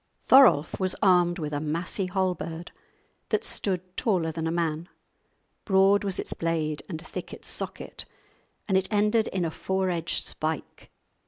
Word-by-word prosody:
Thorolf 250 Hz, -, +6 dB
was 185 Hz, -1 st, 0 dB
armed 175 Hz, -2 st, +4 dB
with 150 Hz, -3 st, -4 dB
a 145 Hz, -, 0 dB
massy 170 Hz, +5 st, -2 dB
halberd 180 Hz, -3 st, -2 dB, 0.6 s
that -, -, +1 dB
stood 185 Hz, -2 st, -1 dB
taller 180 Hz, -8 st, +1 dB
than 160 Hz, 0 st, -3 dB
a -, -, 0 dB
man; 165 Hz, 0 st, -2 dB, 0.7 s
broad 195 Hz, 0 st, +4 dB
was 195 Hz, -2 st, -2 dB
its -, -, -4 dB
blade 160 Hz, -2 st, -1 dB
and 160 Hz, -4 st, -4 dB
thick -, -, -7 dB
its -, -, -10 dB
socket, -, -, -6 dB, 0.6 s
and 190 Hz, -2 st, +4 dB
it 190 Hz, -, -5 dB
ended 210 Hz, +2 st, +2 dB
in 185 Hz, -2 st, -1 dB
a 160 Hz, -, -2 dB
four 190 Hz, +2 st, -1 dB
edged 170 Hz, -1 st, -2 dB
spike. 155 Hz, -1 st, -4 dB
180 Hz, 155 wpm, -27 LUFS, 160-190 Hz, 0.7 s, Thorolf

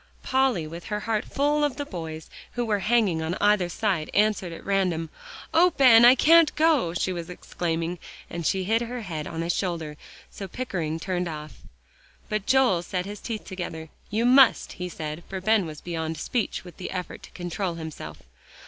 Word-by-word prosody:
Polly 260 Hz, -10 st, +1 dB
with 165 Hz, +2 st, -8 dB
her 210 Hz, -1 st, -3 dB
heart 215 Hz, -1 st, -1 dB
full 295 Hz, +2 st, +1 dB
of 290 Hz, -3 st, +1 dB
the 285 Hz, -, -4 dB
boys, 160 Hz, -, -7 dB, 0.3 s
who 240 Hz, 0 st, -1 dB
were 210 Hz, -2 st, +1 dB
hanging 210 Hz, -5 st, +2 dB
on 160 Hz, +3 st, -2 dB
either 205 Hz, -4 st, +3 dB
side, 180 Hz, -5 st, -1 dB
answered 205 Hz, -4 st, +2 dB
at 165 Hz, -, -10 dB
random. 180 Hz, -5 st, 0 dB, 0.4 s
"Oh, 345 Hz, +2 st, +5 dB
Ben! 235 Hz, -4 st, +8 dB
I 250 Hz, +2 st, +9 dB
can't 330 Hz, +2 st, +5 dB
go," 300 Hz, -, +2 dB
she 185 Hz, +1 st, 0 dB
was 170 Hz, -1 st, -6 dB
exclaiming, 170 Hz, -1 st, -3 dB, 0.3 s
and 170 Hz, 0 st, -5 dB
she 190 Hz, +4 st, +1 dB
hid 225 Hz, +5 st, +1 dB
her 240 Hz, +1 st, -4 dB
head 160 Hz, -7 st, -5 dB
on 165 Hz, 0 st, -4 dB
his 170 Hz, +1 st, 0 dB
shoulder, 165 Hz, -5 st, -3 dB, 0.3 s
so 195 Hz, -, -7 dB
Pickering 170 Hz, -8 st, -3 dB
turned 180 Hz, 0 st, -2 dB
off. 155 Hz, -2 st, -7 dB, 0.7 s
But 215 Hz, -2 st, -2 dB
Joel 260 Hz, -9 st, +4 dB
set 180 Hz, +1 st, -3 dB
his 205 Hz, +1 st, -7 dB
teeth 225 Hz, -3 st, -5 dB
together. 165 Hz, -4 st, -6 dB, 0.2 s
"You 220 Hz, +3 st, 0 dB
must," 260 Hz, +1 st, +5 dB
he 180 Hz, 0 st, -5 dB
said, 155 Hz, -1 st, -6 dB
for 190 Hz, -, -4 dB
Ben 215 Hz, -1 st, +2 dB
was 155 Hz, -1 st, -9 dB
beyond 160 Hz, -2 st, -4 dB
speech 230 Hz, +7 st, -2 dB
with 175 Hz, -3 st, -13 dB
the 185 Hz, -, -6 dB
effort 180 Hz, -1 st, -5 dB
to -, -, -12 dB
control 175 Hz, 0 st, -3 dB
himself. 155 Hz, -, -8 dB
185 Hz, 185 wpm, -25 LUFS, 165-225 Hz, 0.7 s, I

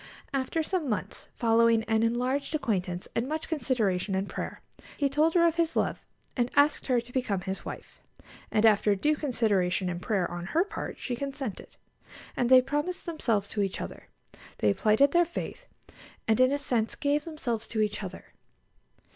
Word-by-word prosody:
After 275 Hz, +4 st, 0 dB
some 330 Hz, -4 st, -1 dB
months, 210 Hz, -5 st, -3 dB
following 230 Hz, -1 st, +4 dB
an 220 Hz, 0 st, +1 dB
enlarged 250 Hz, +6 st, 0 dB
acquaintance 185 Hz, -10 st, -2 dB
and 230 Hz, +2 st, 0 dB
much 315 Hz, +1 st, -3 dB
consideration 220 Hz, -, 0 dB
and 190 Hz, +1 st, -1 dB
prayer, -, -, -5 dB, 0.4 s
he 285 Hz, -, +2 dB
told 305 Hz, +4 st, +2 dB
her 340 Hz, -1 st, +6 dB
of 335 Hz, 0 st, +2 dB
his 335 Hz, -1 st, +1 dB
love, -, -, 0 dB, 0.3 s
and 245 Hz, -1 st, +1 dB
asked 290 Hz, +1 st, +3 dB
her 250 Hz, -3 st, +3 dB
to 240 Hz, +1 st, -10 dB
become 215 Hz, -8 st, 0 dB
his 190 Hz, +2 st, -4 dB
wife; -, -, -9 dB, 0.5 s
and 220 Hz, 0 st, +2 dB
after 210 Hz, -1 st, +4 dB
due 300 Hz, +10 st, +2 dB
consideration 200 Hz, -, +1 dB
and 175 Hz, 0 st, -5 dB
prayer 195 Hz, -5 st, 0 dB
on 175 Hz, 0 st, -5 dB
her 325 Hz, -, +2 dB
part 405 Hz, -, -6 dB
she 250 Hz, -, -3 dB
consented, 270 Hz, -4 st, -5 dB, 0.6 s
and 245 Hz, -, +1 dB
they 255 Hz, -1 st, +8 dB
promised 295 Hz, +7 st, -2 dB
themselves 230 Hz, -, 0 dB
to 210 Hz, -, -1 dB
each 195 Hz, -2 st, -1 dB
other; -, -, -7 dB, 0.5 s
they 105 Hz, -1 st, +3 dB
plighted 220 Hz, -, +4 dB
their 345 Hz, 0 st, +5 dB
faith, 345 Hz, +8 st, -6 dB, 0.6 s
and 220 Hz, +1 st, +3 dB
in 255 Hz, +1 st, +5 dB
a 285 Hz, -, +1 dB
sense 240 Hz, -6 st, -1 dB
gave 290 Hz, +1 st, 0 dB
themselves 245 Hz, -9 st, -3 dB
to 220 Hz, -, -3 dB
each 210 Hz, -1 st, 0 dB
other. -, -, -8 dB
245 Hz, 175 wpm, -28 LUFS, 210-290 Hz, 0.6 s, they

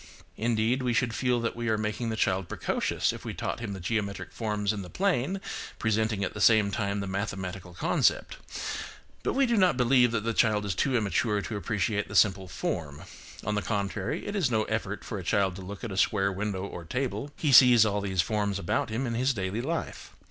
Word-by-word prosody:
Indeed, 115 Hz, +3 st, +1 dB
we 125 Hz, -1 st, 0 dB
should 120 Hz, -1 st, +1 dB
feel 125 Hz, -1 st, +1 dB
that 115 Hz, -, -2 dB
we 120 Hz, -1 st, -2 dB
are 110 Hz, -, +2 dB
making 110 Hz, +2 st, -2 dB
the 110 Hz, -, -2 dB
child 95 Hz, -4 st, 0 dB
precocious -, -, 0 dB
if -, -, -9 dB
we -, -, -5 dB
taught -, -, -3 dB
him 110 Hz, -4 st, -4 dB
the 95 Hz, -, -6 dB
geometric 100 Hz, +1 st, -2 dB
forms 105 Hz, -2 st, -1 dB
in 105 Hz, -, -4 dB
the 90 Hz, -, -9 dB
plane, 190 Hz, -, 0 dB, 0.4 s
presenting 110 Hz, -1 st, 0 dB
at 95 Hz, -, -2 dB
the 105 Hz, -, -5 dB
same 105 Hz, -1 st, +5 dB
time 100 Hz, -1 st, -1 dB
the -, -, -3 dB
mathematical 95 Hz, -2 st, -4 dB
con -, -, 0 dB
cept, -, -, +2 dB, 0.8 s
but -, -, -1 dB
we 275 Hz, 0 st, +3 dB
do 235 Hz, -2 st, +1 dB
not 185 Hz, -8 st, +4 dB
believe 125 Hz, 0 st, +4 dB
that 110 Hz, -3 st, -1 dB
the 115 Hz, 0 st, -1 dB
child 105 Hz, -2 st, +2 dB
is 100 Hz, -, -1 dB
too 130 Hz, +7 st, +1 dB
immature 105 Hz, 0 st, +1 dB
to 110 Hz, -, -4 dB
appreciate 105 Hz, 0 st, -1 dB
the 100 Hz, -, -8 dB
simple 95 Hz, -2 st, +4 dB
form; 75 Hz, -3 st, -4 dB, 0.4 s
on 105 Hz, -, 0 dB
the 105 Hz, -, 0 dB
contrary, 100 Hz, -, -2 dB
it 205 Hz, -, -4 dB
is 180 Hz, -10 st, +2 dB
no 110 Hz, -2 st, +2 dB
effort 110 Hz, -2 st, -3 dB
for 105 Hz, -, -4 dB
a -, -, -7 dB
child 95 Hz, 0 st, +1 dB
to 95 Hz, -, -8 dB
look 100 Hz, +3 st, -8 dB
at 115 Hz, -, -4 dB
a 95 Hz, -, -5 dB
square 100 Hz, 0 st, +2 dB
window 100 Hz, 0 st, -3 dB
or 90 Hz, -3 st, -7 dB
table,–he 135 Hz, -, -2 dB
sees 120 Hz, -3 st, +8 dB
all 105 Hz, -1 st, 0 dB
these 95 Hz, -3 st, +1 dB
forms 100 Hz, +2 st, -1 dB
about 90 Hz, +3 st, -1 dB
him 115 Hz, +5 st, -2 dB
in 120 Hz, -, -2 dB
his 130 Hz, +3 st, +1 dB
daily 100 Hz, +2 st, -2 dB
life. 165 Hz, +6 st, -4 dB
105 Hz, 220 wpm, -28 LUFS, 100-120 Hz, 0.8 s, sees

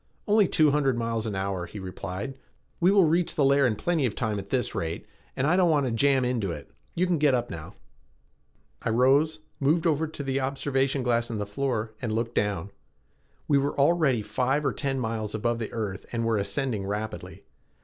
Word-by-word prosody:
"Only 210 Hz, -2 st, +5 dB
two 155 Hz, -3 st, +4 dB
hundred 135 Hz, -4 st, +2 dB
miles 115 Hz, -1 st, -1 dB
an 105 Hz, -, -3 dB
hour," 95 Hz, -2 st, -2 dB
he -, -, -10 dB
replied. 95 Hz, +5 st, -5 dB, 0.5 s
"We 175 Hz, -, +4 dB
will 195 Hz, -2 st, +5 dB
reach 165 Hz, +2 st, +1 dB
the 145 Hz, -, +3 dB
layer 140 Hz, 0 st, +4 dB
in 110 Hz, -, 0 dB
plenty 160 Hz, +1 st, +1 dB
of 105 Hz, -, -5 dB
time 110 Hz, -4 st, -1 dB
at 100 Hz, 0 st, -9 dB
this 125 Hz, +2 st, 0 dB
rate 80 Hz, 0 st, -3 dB, 0.3 s
and 130 Hz, -, 0 dB
I 160 Hz, +4 st, +3 dB
don't 180 Hz, -2 st, +4 dB
want 145 Hz, -3 st, +3 dB
to 125 Hz, -, -1 dB
jam 135 Hz, +2 st, +3 dB
into 115 Hz, -7 st, -1 dB
it. -, -, -8 dB, 0.2 s
You 180 Hz, -, +2 dB
can 175 Hz, -3 st, +1 dB
get 145 Hz, -3 st, +4 dB
up 120 Hz, -1 st, -2 dB
now." 80 Hz, -1 st, -8 dB, 1.1 s
I -, -, -2 dB
rose, 140 Hz, +7 st, +3 dB, 0.2 s
moved 155 Hz, +4 st, +2 dB
over 160 Hz, -1 st, +2 dB
to 150 Hz, -2 st, -7 dB
the 135 Hz, 0 st, -1 dB
observation 135 Hz, 0 st, 0 dB
glass 120 Hz, -1 st, +1 dB
in 115 Hz, -, -3 dB
the 105 Hz, -, -2 dB
floor, 110 Hz, 0 st, -2 dB
and 120 Hz, -4 st, -2 dB
looked 115 Hz, +2 st, -1 dB
down. 100 Hz, -3 st, -1 dB, 0.8 s
We 140 Hz, -2 st, +4 dB
were 140 Hz, +1 st, -2 dB
already 140 Hz, -6 st, +3 dB
five 130 Hz, +7 st, 0 dB
or 135 Hz, -, +1 dB
ten 135 Hz, -2 st, -2 dB
miles 110 Hz, -3 st, -3 dB
above 115 Hz, +2 st, -1 dB
the 110 Hz, -, -4 dB
earth 105 Hz, -4 st, -4 dB
and 115 Hz, -1 st, -1 dB
were 115 Hz, -2 st, +1 dB
ascending 110 Hz, -2 st, -1 dB
rapidly. 105 Hz, +2 st, -5 dB
125 Hz, 205 wpm, -27 LUFS, 110-145 Hz, 1.1 s, Only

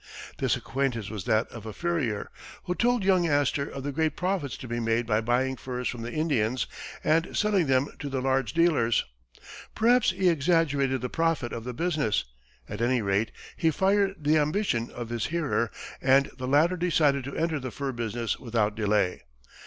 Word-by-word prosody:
This -, -, +2 dB
acquaintance 125 Hz, -6 st, -2 dB
was 105 Hz, -5 st, -5 dB
that 110 Hz, +2 st, +2 dB
of 110 Hz, -2 st, -9 dB
a 110 Hz, -, -6 dB
furrier, 155 Hz, -12 st, -2 dB, 0.3 s
who 180 Hz, -, -1 dB
told 240 Hz, +2 st, +1 dB
young 185 Hz, -3 st, +3 dB
Astor 145 Hz, -1 st, +1 dB
of 135 Hz, -, -7 dB
the 145 Hz, -, -2 dB
great 155 Hz, +1 st, 0 dB
profits 180 Hz, -6 st, -1 dB
to 130 Hz, -, -8 dB
be 120 Hz, 0 st, -2 dB
made 115 Hz, +1 st, +1 dB
by 110 Hz, -1 st, +1 dB
buying 125 Hz, +3 st, +1 dB
furs 125 Hz, 0 st, -4 dB
from 120 Hz, -, -4 dB
the 115 Hz, +1 st, -5 dB
Indians 130 Hz, -7 st, 0 dB, 0.4 s
and 160 Hz, +2 st, +1 dB
selling 200 Hz, -6 st, +2 dB
them 130 Hz, +1 st, +3 dB
to 145 Hz, -, -4 dB
the 135 Hz, -1 st, -2 dB
large 130 Hz, -3 st, 0 dB
dealers. 155 Hz, -9 st, +3 dB, 0.7 s
Perhaps 240 Hz, +3 st, +4 dB
he 185 Hz, 0 st, +1 dB
exaggerated 145 Hz, -5 st, +2 dB
the 125 Hz, -, -3 dB
profits 165 Hz, -7 st, 0 dB
of 115 Hz, -, -5 dB
the 125 Hz, -, -4 dB
business; 155 Hz, -9 st, 0 dB, 0.4 s
at 105 Hz, +2 st, -6 dB
any 120 Hz, -1 st, +2 dB
rate, 100 Hz, +3 st, +1 dB, 0.2 s
he 165 Hz, -, +2 dB
fired 195 Hz, +3 st, +2 dB
the 155 Hz, 0 st, +2 dB
ambition 150 Hz, -, 0 dB
of 120 Hz, -2 st, -7 dB
his 120 Hz, -2 st, -2 dB
hearer, 155 Hz, -8 st, 0 dB, 0.3 s
and 135 Hz, +1 st, +4 dB
the 130 Hz, -1 st, -5 dB
latter 155 Hz, +7 st, +3 dB
decided 155 Hz, -6 st, +2 dB
to 140 Hz, -, -6 dB
enter 160 Hz, -2 st, 0 dB
the 130 Hz, -1 st, -5 dB
fur 140 Hz, +2 st, -4 dB
business 115 Hz, -1 st, -3 dB
without 115 Hz, -4 st, 0 dB
delay. 105 Hz, -3 st, +1 dB
135 Hz, 185 wpm, -27 LUFS, 120-165 Hz, 0.7 s, Perhaps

